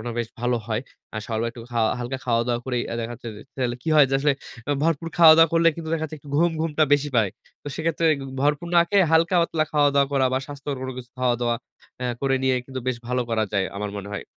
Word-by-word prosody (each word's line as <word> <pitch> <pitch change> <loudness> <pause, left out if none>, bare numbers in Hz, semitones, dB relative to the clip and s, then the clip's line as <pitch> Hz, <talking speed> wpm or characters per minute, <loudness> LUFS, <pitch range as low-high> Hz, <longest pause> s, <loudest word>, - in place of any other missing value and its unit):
মানে 120 +2 -5
বেশ 120 -2 -2
ভালো 120 0 +1
হয়। 110 -1 -1 0.3
আর 110 - -3
সকাল 110 -2 -2
বেলা 115 0 -1
একটু 120 - -10
খাওয়া 115 -2 +2
হালকা 125 +2 -4
খাওয়া-দাওয়া 120 0 +1
করেই 125 -2 -1
আ - - -2
দেখা 115 +1 -4
যাচ্ছে 120 - -9
যে - - -10 0.2
তাইলে 125 -2 -1
কি - - -5
হয় 150 -2 +7
যে - - +1
আসলে 145 +1 +3 0.3
অ্যা 145 - +1
ভরপুর 165 0 0
খাওয়া-দাওয়া 165 -1 +8
করলে 165 0 +5
কিন্তু 165 -1 -6
দেখা 165 -1 0
যাচ্ছে 155 0 -6
একটু 145 - -15
ঘুম, 170 +3 +4
ঘুমটা 160 -1 +1
বেশি 145 0 +3
পায়। 110 -4 +3 0.3
তো - - -19
সেক্ষেত্রে 165 0 -1 0.2
গ - - -7 0.2
ভরপুর 145 +3 +1
না - - +8
খেয়ে 200 -2 +4
হালকা-পাতলা 165 -1 +3
খাওয়া 145 -1 +4
দাওয়া 140 -1 +3
করা 135 -1 +3
বা 130 - +2
স্বাস্থ্যকর 145 -1 -5
কোন 130 - -4
কিছু 125 -1 -10
খাওয়া-দাওয়া 120 -2 +1 0.4
অ্যা 125 -1 -1
করে 135 -1 +1
নিয়েই 130 -1 +2
কিন্তু 130 -1 -6
বেশ 130 - 0
ভালো 125 0 0
করা 110 -1 +1
যায় 100 -2 +1
আমার 105 0 -3
মনে 100 0 -7
হয়। 100 - -5
135 Hz, 245 wpm, -24 LUFS, 120-155 Hz, 0.4 s, খাওয়া-দাওয়া